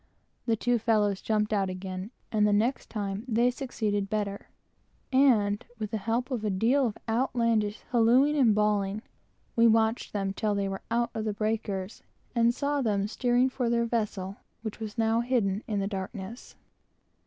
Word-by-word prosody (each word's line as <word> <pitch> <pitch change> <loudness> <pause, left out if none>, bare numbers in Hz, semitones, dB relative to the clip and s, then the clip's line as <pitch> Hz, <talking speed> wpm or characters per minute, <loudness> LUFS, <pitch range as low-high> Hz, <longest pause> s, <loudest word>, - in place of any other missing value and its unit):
The 230 - +3
two 245 +2 +1
fellows 210 -3 +1
jumped 215 -1 0
out 195 -2 +1
again; 185 +1 -5 0.2
and 210 -1 +3
the - - +2
next 225 +6 +1
time 200 -1 -3
they 240 +1 +3
succeeded 215 -6 -2
better, 205 -2 -3 0.7
and, 225 -6 +4
with 215 -1 -4
the 220 - -1
help 230 +6 -1
of 240 -4 -2
a 215 - 0
deal 240 +8 +2
of 215 - -5
outlandish 230 -3 +1
hallooing 250 +5 +4
and 240 -7 +4
bawling, 205 -2 +1
got 215 - -6
her - - -34
well - - -36
off. - - -40
We 230 0 +6
watched 225 +1 +2
them 195 -2 -1
till 210 +1 0
they 200 -1 0
were 195 0 -4
out 235 +1 0
of 220 -1 -3
the 215 - -1
breakers, 210 -2 -2 0.3
and 235 -1 +4
saw 285 +3 -1
them 205 -5 +1
steering 245 +3 +2
for 250 -2 -1
their 235 0 +2
vessel, 210 -4 -2 0.3
which 220 -1 -5
was 220 0 -6
now 225 0 +2
hidden 230 -5 0
in 210 -2 -1
the 195 - 0
darkness. 195 +3 -6
220 Hz, 185 wpm, -28 LUFS, 205-235 Hz, 0.7 s, We